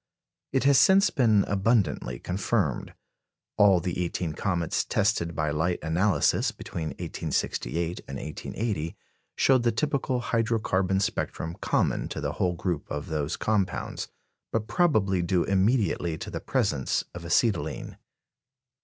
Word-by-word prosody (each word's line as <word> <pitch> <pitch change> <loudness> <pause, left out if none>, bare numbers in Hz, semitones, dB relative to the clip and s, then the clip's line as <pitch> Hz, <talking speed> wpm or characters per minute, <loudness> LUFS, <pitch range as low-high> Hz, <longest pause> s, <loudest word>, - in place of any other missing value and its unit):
It 135 - +1
has 140 -1 +6
since 195 0 +5
been 110 -6 +4
abundantly 100 - +1
confirmed. 90 +8 -1 0.6
All 100 -3 +5
the 90 +1 -2
eighteen 85 -2 -2
comets 85 -1 -1
tested 100 -6 0
by 75 -1 0
light 80 +4 0
analysis, 90 +5 +2
between 80 -2 -6
1868 85 +7 -2
and 70 - -5
1880, 85 +2 -4 0.4
showed 130 -2 +4
the 120 0 +2
typical 135 0 0
hydro 115 -1 +1
carbon 95 -2 +1
spectrum 80 -3 -2
common - - +1
to - - -5
the - - -2
whole 90 -1 0
group 85 -3 -3
of 75 +4 -4
those 75 0 -2
compounds, 105 -3 -1 0.4
but 115 -1 -1
probably 110 - +2
due 85 0 +1
immediately 95 -5 +1
to - - -7
the - - -4
presence 70 -4 0
of - - -8
acetylene. - - 0
95 Hz, 130 wpm, -27 LUFS, 85-115 Hz, 0.6 s, has